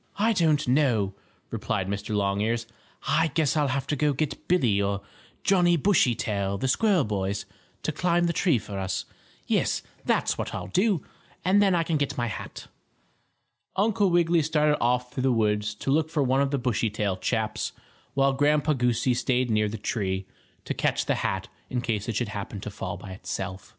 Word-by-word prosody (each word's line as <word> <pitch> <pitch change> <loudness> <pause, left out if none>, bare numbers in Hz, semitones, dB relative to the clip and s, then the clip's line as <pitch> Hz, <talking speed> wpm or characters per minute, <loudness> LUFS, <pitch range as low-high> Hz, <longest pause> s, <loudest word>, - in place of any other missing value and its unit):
"I 225 +3 +3
don't 155 -6 +2
know," 120 -7 +2 0.4
replied 95 - -2
Mr. 100 +2 -3
Longears. 105 +4 0 0.4
"I 160 +3 +3
guess 160 -3 +2
I'll 150 -2 +2
have 135 0 -1
to 150 - -1
go 150 +1 +2
get 150 +2 -3
Billie 120 - +3
or 100 0 -1 0.4
Johnnie 175 -3 +4
Bushytail, 115 - +1
the 130 - -1
squirrel 195 - +3
boys, 100 -2 -2 0.4
to - - 0
climb 175 +3 +1
the 170 0 +1
tree 165 -8 +3
for 100 -2 -6
us. 95 0 -2 0.4
Yes, - - +1 0.2
that's - - +1
what - - -3
I'll - - -5
do; 190 -3 +2 0.4
and 195 +3 +5
then 195 -3 +4
I 170 - +2
can 160 -1 0
get 145 -2 -1
my 120 - 0
hat." 110 - -6 1.1
Uncle 205 0 +2
Wiggily 170 -1 +3
started 150 -1 +2
off 125 +1 +1
through 130 - -2
the 130 0 +3
woods 105 -2 +1
to 135 - -2
look 155 +2 +2
for 155 -3 +1
one 135 +1 +2
of 140 - +2
the 140 - 0
Bushytail 110 -5 0
chaps, - - -1 0.4
while 135 0 +3
Grandpa 150 +2 +3
Goosey 125 -1 +1
stayed 125 0 +1
near 105 -1 +2
the 110 - -5
tree, 95 -3 -2 0.4
to - - -2
catch - - 0
the - - +2
hat - - -1 0.2
in 125 - -1
case 115 -3 -2
it 115 - -2
should 120 -1 -1
happen 105 0 -5
to 105 - -6
fall 95 0 -5
by 95 - -9
itself. 95 0 -5
130 Hz, 185 wpm, -26 LUFS, 105-155 Hz, 1.1 s, and